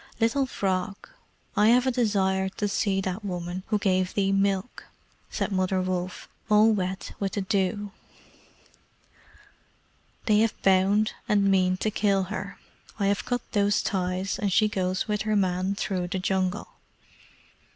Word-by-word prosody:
Little 245 Hz, +4 st, +2 dB
Frog, 195 Hz, -2 st, -3 dB, 0.5 s
I 210 Hz, -, +4 dB
have 245 Hz, +2 st, +5 dB
a 260 Hz, -, +2 dB
desire 195 Hz, -5 st, +1 dB
to 205 Hz, +2 st, -3 dB
see 195 Hz, -1 st, 0 dB
that 190 Hz, +2 st, -4 dB
woman 180 Hz, -1 st, -4 dB
who 215 Hz, -, +1 dB
gave 185 Hz, -2 st, 0 dB
thee 195 Hz, -1 st, +1 dB
milk," 195 Hz, +2 st, 0 dB, 0.4 s
said -, -, -2 dB
Mother 185 Hz, 0 st, +1 dB
Wolf, 185 Hz, 0 st, -3 dB, 0.2 s
all 215 Hz, +1 st, +6 dB
wet 190 Hz, -2 st, -2 dB
with 195 Hz, -1 st, -2 dB
the 205 Hz, -, -1 dB
dew. 200 Hz, +1 st, -1 dB, 2.3 s
"They 210 Hz, -2 st, +4 dB
have 225 Hz, 0 st, +1 dB
bound 195 Hz, +3 st, +3 dB, 0.2 s
and 205 Hz, -1 st, +3 dB
mean 185 Hz, -1 st, +2 dB
to 215 Hz, -, -1 dB
kill 200 Hz, -2 st, +1 dB
her. 200 Hz, 0 st, -6 dB, 0.4 s
I 200 Hz, -, 0 dB
have 200 Hz, +1 st, 0 dB
cut 245 Hz, -1 st, -1 dB
those 205 Hz, -1 st, +2 dB
ties, 185 Hz, 0 st, -2 dB
and 200 Hz, -1 st, 0 dB
she 215 Hz, +3 st, +4 dB
goes 185 Hz, -2 st, -1 dB
with 210 Hz, -1 st, -1 dB
her 215 Hz, 0 st, 0 dB
man 185 Hz, 0 st, 0 dB
through 185 Hz, -3 st, -2 dB
the 190 Hz, +2 st, -3 dB
Jungle." 185 Hz, +1 st, -1 dB
195 Hz, 150 wpm, -26 LUFS, 185-210 Hz, 2.3 s, all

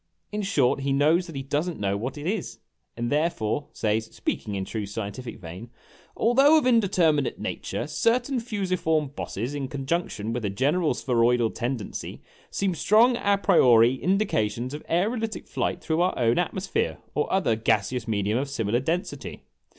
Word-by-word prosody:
In 210 Hz, 0 st, -2 dB
short, 145 Hz, -11 st, +2 dB
he 135 Hz, 0 st, -1 dB
knows 155 Hz, +6 st, +3 dB
that 165 Hz, -, -9 dB
he 135 Hz, -, -4 dB
does 145 Hz, +5 st, -1 dB
n't 170 Hz, -, -7 dB
know 100 Hz, -1 st, 0 dB
what 125 Hz, +8 st, -4 dB
it 145 Hz, -, -7 dB
is, 200 Hz, +1 st, -2 dB, 0.4 s
and 120 Hz, 0 st, -2 dB
therefore 145 Hz, -4 st, 0 dB
says 110 Hz, +1 st, 0 dB
(speaking 105 Hz, -2 st, -4 dB
in 95 Hz, -1 st, -2 dB
true 105 Hz, -1 st, -4 dB
scientific 110 Hz, +4 st, -6 dB
vein) 90 Hz, +6 st, -9 dB, 0.5 s
"Although 270 Hz, +7 st, +5 dB
of 300 Hz, -, +1 dB
indeterminate 180 Hz, -, +2 dB
nature, -, -, -4 dB
certain 240 Hz, -, +1 dB
fusiform 185 Hz, -, -1 dB
bosses, 125 Hz, -2 st, -5 dB
in 140 Hz, -2 st, -3 dB
conjunction 135 Hz, -5 st, -2 dB
with 120 Hz, -1 st, -3 dB
a 105 Hz, -, 0 dB
gen 130 Hz, +9 st, +1 dB
eral 180 Hz, -4 st, +1 dB
spheroidal 120 Hz, -2 st, +2 dB
tendency, 120 Hz, -2 st, -5 dB, 0.3 s
seem 195 Hz, -2 st, -1 dB
strong 225 Hz, +8 st, +4 dB
a 200 Hz, -3 st, +2 dB
priori 125 Hz, -, +5 dB
indications 130 Hz, -, 0 dB
of 150 Hz, -, -6 dB
aerolitic 220 Hz, +5 st, -1 dB
flight 175 Hz, -, -2 dB
through 160 Hz, +1 st, 0 dB
our 180 Hz, -, +1 dB
own 120 Hz, +4 st, +2 dB
atmosphere, 190 Hz, +2 st, -1 dB, 0.2 s
or 150 Hz, -, -1 dB
other 190 Hz, -12 st, +2 dB
gaseous 110 Hz, +2 st, 0 dB
medium 105 Hz, +1 st, 0 dB
of 140 Hz, +1 st, -3 dB
similar 115 Hz, -3 st, 0 dB
density 165 Hz, +7 st, -3 dB
145 Hz, 165 wpm, -26 LUFS, 115-185 Hz, 0.5 s, Although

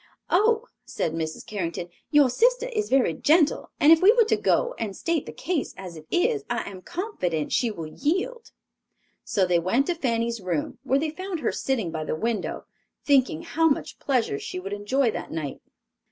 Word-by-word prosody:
"Oh," 440 Hz, +5 st, +3 dB, 0.2 s
said 160 Hz, -, -3 dB
Mrs. 160 Hz, -1 st, -4 dB
Carrington, 175 Hz, -3 st, -4 dB, 0.2 s
"your 295 Hz, -3 st, +6 dB
sister -, -, +2 dB
is 430 Hz, -3 st, -2 dB
very 260 Hz, -10 st, +3 dB
gentle 305 Hz, -, +2 dB
and 305 Hz, 0 st, +6 dB
if 325 Hz, -, +7 dB
we 380 Hz, -, +7 dB
go 475 Hz, -, +6 dB
to 445 Hz, -, 0 dB
her -, -, +3 dB
and 205 Hz, -4 st, -3 dB
state 335 Hz, -3 st, -1 dB
the -, -, -5 dB
case 325 Hz, -2 st, -3 dB
as 185 Hz, -3 st, -8 dB
it 155 Hz, 0 st, -12 dB
is, 425 Hz, +4 st, +1 dB
I -, -, -2 dB
am 190 Hz, -2 st, -8 dB
confident 185 Hz, -, -3 dB
she 240 Hz, -, +2 dB
will 170 Hz, -7 st, -6 dB
yield." 370 Hz, -, -2 dB, 0.7 s
So 195 Hz, -, +1 dB
they 180 Hz, -1 st, +3 dB
went 210 Hz, +11 st, +1 dB
to 350 Hz, -, 0 dB
Fanny's 235 Hz, -7 st, -1 dB
room, 175 Hz, -5 st, -3 dB
where 270 Hz, 0 st, +1 dB
they 305 Hz, +2 st, -1 dB
found 370 Hz, 0 st, -5 dB
her -, -, +1 dB
sitting 230 Hz, -11 st, -1 dB
by 160 Hz, -1 st, -3 dB
the 155 Hz, -, -2 dB
window, 225 Hz, +6 st, -2 dB, 0.4 s
thinking 260 Hz, -, +3 dB
how 325 Hz, +1 st, +2 dB
much 280 Hz, -, -2 dB
pleasure 240 Hz, -, 0 dB
she 185 Hz, -, -5 dB
would 195 Hz, +2 st, -5 dB
enjoy 225 Hz, +5 st, +1 dB
that -, -, -6 dB
night. 155 Hz, -4 st, -4 dB
260 Hz, 190 wpm, -25 LUFS, -, 0.7 s, if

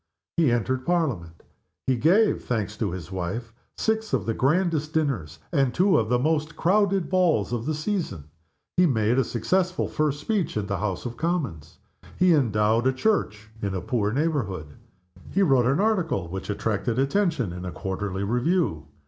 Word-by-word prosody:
He 160 Hz, -7 st, +4 dB
entered 125 Hz, +2 st, 0 dB
Parliament. 125 Hz, -, -1 dB, 0.4 s
He 130 Hz, -, +2 dB
gave 185 Hz, -, +3 dB
(thanks 105 Hz, -3 st, -2 dB
to 110 Hz, -3 st, -1 dB
his 90 Hz, -1 st, -7 dB
wife) 95 Hz, +6 st, -4 dB, 0.2 s
six 220 Hz, 0 st, -1 dB
of -, -, +1 dB
the 115 Hz, -, 0 dB
grandest 155 Hz, +3 st, +1 dB
dinners, 110 Hz, -, -1 dB
and 135 Hz, -6 st, +2 dB
two 185 Hz, +2 st, +4 dB
of 110 Hz, -1 st, -1 dB
the 125 Hz, -, +3 dB
most 155 Hz, +3 st, 0 dB
crowded 195 Hz, 0 st, +2 dB
balls 170 Hz, -, +2 dB
of 120 Hz, +2 st, -2 dB
the 155 Hz, -, 0 dB
season. 160 Hz, -, -2 dB, 0.5 s
He 180 Hz, 0 st, +6 dB
made 115 Hz, -2 st, +2 dB
a -, -, +4 dB
successful 180 Hz, -, 0 dB
first 150 Hz, -2 st, -1 dB
speech 195 Hz, -, -1 dB
in 105 Hz, -, -1 dB
the 100 Hz, -2 st, -2 dB
House 100 Hz, -1 st, -3 dB
of 120 Hz, -1 st, -5 dB
Commons. 135 Hz, -, -2 dB, 0.4 s
He 180 Hz, -1 st, +5 dB
endowed 115 Hz, -3 st, +2 dB
a 130 Hz, -, +3 dB
church 110 Hz, -, -1 dB
in 100 Hz, -2 st, -2 dB
a -, -, -1 dB
poor 105 Hz, +2 st, 0 dB
neighborhood. 110 Hz, -, -1 dB, 0.6 s
He 200 Hz, -, +2 dB
wrote 135 Hz, -8 st, +4 dB
an 135 Hz, +6 st, +2 dB
article 185 Hz, -, +1 dB
which 95 Hz, +3 st, -6 dB
attracted 110 Hz, +2 st, -1 dB
attention 135 Hz, -, +1 dB
in 90 Hz, 0 st, -7 dB
a 90 Hz, -, -4 dB
quarterly 95 Hz, +3 st, -3 dB
review. 120 Hz, -, 0 dB
125 Hz, 170 wpm, -25 LUFS, 105-165 Hz, 0.6 s, He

